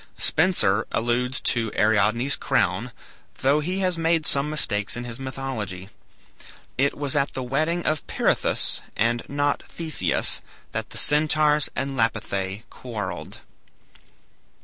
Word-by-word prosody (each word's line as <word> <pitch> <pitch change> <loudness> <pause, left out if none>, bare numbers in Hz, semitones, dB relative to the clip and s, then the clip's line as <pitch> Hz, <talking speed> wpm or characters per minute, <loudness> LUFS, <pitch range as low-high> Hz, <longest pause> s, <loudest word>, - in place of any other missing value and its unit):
Spenser 145 - +1
alludes 120 +3 0
to 115 -3 0
Ariadne's 110 +5 +2
crown, 95 +8 0 0.5
though 140 +3 +3
he 180 +5 -2
has 180 -3 +1
made 165 -1 +1
some 140 +1 +7
mistakes 110 -9 0
in 120 - -4
his 120 0 -8
mythology. 120 -8 -5 0.9
It 140 +2 +1
was 145 0 -2
at 140 -1 +1
the 130 - -4
wedding 155 +7 -1
of 155 -1 -1
Pirithous, - - +1 0.2
and 115 +2 +1
not 145 0 0
Theseus, 155 - -1 0.3
that - - -4
the - - -9
Centaurs 150 0 +3
and 135 +1 -3
Lapithae 105 -4 -2
quarrelled. 105 -8 -6
130 Hz, 125 wpm, -24 LUFS, 110-150 Hz, 0.9 s, some